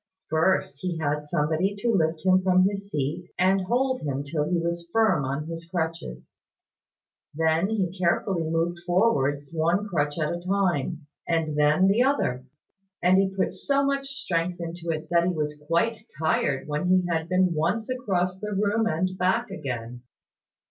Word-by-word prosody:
First, 160 -3 +1
he 180 -2 -2
had 150 -1 -2
somebody 160 +5 0
to 230 +4 0
lift 160 -2 0
him 185 0 +5
from 185 0 +4
his 200 0 -4
seat, 150 +2 -3
and 190 +2 +3
hold 255 +6 0
him 140 -1 -2
till 150 +1 -2
he 180 - +1
was 170 0 -3
firm 215 -9 +3
on 140 +3 -3
his 165 +1 -7
crutches. 160 - -4 1.0
Then 160 +4 +2
he 190 -5 -1
carefully 175 +1 +1
moved 165 +1 0
forwards 145 -7 +1
one 170 +6 +1
crutch 145 -5 -1
at 155 -1 0
a 175 - -4
time, 175 -5 0 0.2
and 165 -3 0
then 150 +5 +4
the 205 +5 +3
other; 250 - +1 0.6
and 185 +2 +5
he 195 0 +2
put 190 0 -1
so 280 0 0
much 275 0 -1
strength 180 - -2
into 170 0 -6
it, 155 -1 -2
that 170 0 +4
he 180 - +1
was 150 -2 -3
quite 215 +8 +1 0.2
tired 150 -4 0
when 150 +4 -1
he 185 0 +3
had 165 -1 -1
been 185 -1 +3
once 175 +8 0
across 190 -8 -1
the 210 0 -4
room 210 +3 +1
and 185 +1 -1
back 210 +7 +1
again. 120 -4 -5
175 Hz, 170 wpm, -26 LUFS, 155-195 Hz, 1.0 s, him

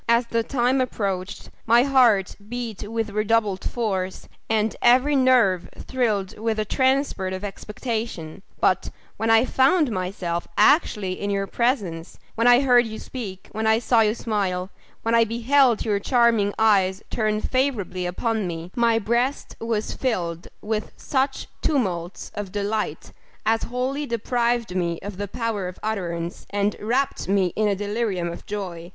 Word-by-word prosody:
as 235 +1 +4
the 230 - +2
time 250 +2 +1
approached, 195 -6 -3 0.2
my 235 +2 +6
heart 245 -8 +3
beat 230 -4 -5
with 225 -2 -2
redoubled 215 -2 +1
force, 190 -6 -2 0.2
and 220 -1 +1
every 255 +4 +5
nerve 245 -9 +3
thrilled 215 -7 -1
with 225 0 -1
a 215 - 0
transport 260 -6 +1
of 185 +1 -5
expectation; 210 -4 -5 0.2
but, - - +2 0.3
when 225 - -1
I 225 +2 +5
found 270 +2 +3
myself 180 -3 -3
actually 210 - +3
in 205 - -2
your 200 0 0
presence; 195 - -1 0.2
when 230 +1 +1
I 245 +1 +7
heard 245 -3 +4
you 220 0 -6
speak; 200 -8 -7
when 220 +1 -2
I 220 0 +5
saw 235 0 +3
you 215 0 +2
smile; 195 -5 -2 0.3
when 230 - 0
I 230 0 +6
beheld 235 +2 +2
your 205 -2 +1
charming 230 -3 +2
eyes 195 -3 +3
turned 215 -1 0
favourably 210 -9 0
upon 220 +2 -1
me; 170 +1 -6
my 235 -1 +3
breast 235 +5 -1
was 225 -2 -2
filled 175 -10 -2 0.2
with 215 0 -3
such 270 0 -1 0.2
tumults 185 - -1
of 205 -2 -5
delight, 205 -5 -2 0.3
as 225 +1 +2
wholly 265 +4 -2
deprived 235 -2 0
me 170 -2 0
of 200 -2 -6
the 205 0 -3
power 215 -2 -2
of 180 - -8
utterance, 175 -5 -3
and 205 0 0
wrapt 250 +6 -1
me 190 -3 +2
in 215 0 +2
a 200 - +1
delirium 205 -3 -2
of - - -11
joy! 180 -5 -5
220 Hz, 155 wpm, -23 LUFS, 195-240 Hz, 0.3 s, I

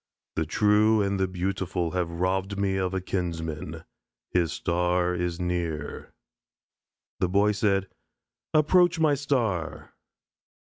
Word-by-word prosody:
The 80 -1 -1
true 105 +3 +4
and 100 0 -1
the 95 - +2
beautiful 90 -2 -2
have 90 -2 -1
robbed 95 +3 -1
me 100 -1 0
of 95 0 -1
a 95 - -1
kinsman. 85 -4 -4 0.5
His 85 -3 +1
star 90 +1 0
is 90 -1 -2
near." 85 -4 -3
Said - - -30 1.1
the 90 - +1
Boy: 100 +3 +3
"I 100 -2 +4 0.8
approach 175 +3 +4
my 155 -2 +4
star." 125 - -1
95 Hz, 120 wpm, -26 LUFS, 85-100 Hz, 1.1 s, true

